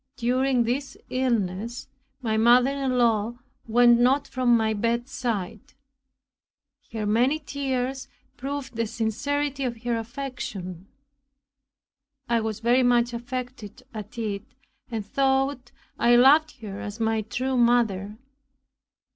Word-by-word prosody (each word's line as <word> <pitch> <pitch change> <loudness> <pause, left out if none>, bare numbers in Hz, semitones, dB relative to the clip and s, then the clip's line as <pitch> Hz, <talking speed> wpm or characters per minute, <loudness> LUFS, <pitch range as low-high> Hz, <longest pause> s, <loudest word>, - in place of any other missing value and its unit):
During 250 +1 +2
this 260 +4 -3
illness, 235 -3 -1 0.4
my 220 -2 0
mother 240 +4 +5
in 270 -2 -1
law 230 -1 +2 0.3
went 240 +1 +5
not 265 +4 +3
from 250 -3 +3
my 220 -1 +1
bedside; 230 -2 -2 1.3
her 220 -2 -3
many 240 +8 +2
tears 270 -3 -3 0.3
proved 275 0 -5
the 230 0 -1
sincerity 275 +6 -2
of 235 -2 -4
her 240 -1 0
affection. 220 -7 -6 1.4
I 235 -1 +2
was 220 -1 -4
very 240 +3 +4
much 245 -1 +3
affected 245 -1 -6
at 215 +1 -8
it, 215 0 -4 0.3
and 225 -4 -4
thought 265 +1 0 0.3
I 240 0 +5
loved 275 +2 +5
her 200 -2 -6
as 205 +2 -6
my 225 -1 +1
true 255 +5 -2
mother. 225 -4 +2
240 Hz, 115 wpm, -25 LUFS, 220-260 Hz, 1.4 s, mother